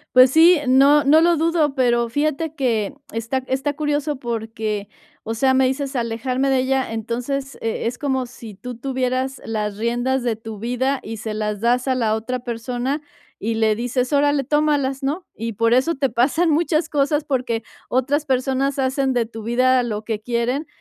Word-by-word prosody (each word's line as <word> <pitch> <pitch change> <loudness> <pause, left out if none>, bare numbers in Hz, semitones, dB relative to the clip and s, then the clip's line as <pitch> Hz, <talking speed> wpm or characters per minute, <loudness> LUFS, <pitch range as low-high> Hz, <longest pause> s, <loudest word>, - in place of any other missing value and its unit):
Pues 255 0 +8
sí, 335 +3 +7
no 275 +3 +5
no 300 +3 +6
lo 340 +1 +4
dudo, 320 -3 +1
pero 240 -2 +2
fíjate 305 +4 -1
que 240 -3 0 0.2
está 230 +4 -2
está 270 +2 -1
curioso 295 0 -1
porque, 220 -4 -3 0.3
o 225 - -4
sea, 260 +3 +2
me 260 0 +4
dices: 270 +2 -2
"Alejarme 250 +3 -1
de 265 - +3
ella", 260 -1 0
entonces, 245 +5 -3
e 225 0 -2
es 240 +2 -2
como 265 -1 -1
si 230 -4 -11
tú 250 +5 -7
tuvieras 260 +1 -2
las 210 -2 -2
riendas 245 +3 0
de 235 -2 +1
tu 220 -1 -9
vida 250 +5 -1
y 225 +1 -6
se 215 +1 -4
las 210 -1 -3
das 245 +3 +1
a 260 - +2
la 225 -4 +1
otra 250 +3 -3
persona 245 +4 -3 0.4
y 225 +2 -2
le 220 -1 +2
dices: 245 +3 -1
"Órale, 290 0 +3
tómalas, 285 -1 0
¿no?", 305 +7 -2
y 230 +1 -4
por 230 +2 +2
eso 265 +7 +2
te 275 -2 0
pasan 275 +9 +2
muchas 320 +1 +1
cosas, 295 0 +1
porque 250 -5 -1 0.3
otras 280 +4 0
personas 265 +1 0
hacen 265 0 +1
de 240 -2 +1
tu 225 -1 -9
vida 255 +2 +3
lo 215 -3 -3
que 220 -1 -3
quieren. 245 +6 -1
255 Hz, 180 wpm, -21 LUFS, 230-275 Hz, 0.4 s, Pues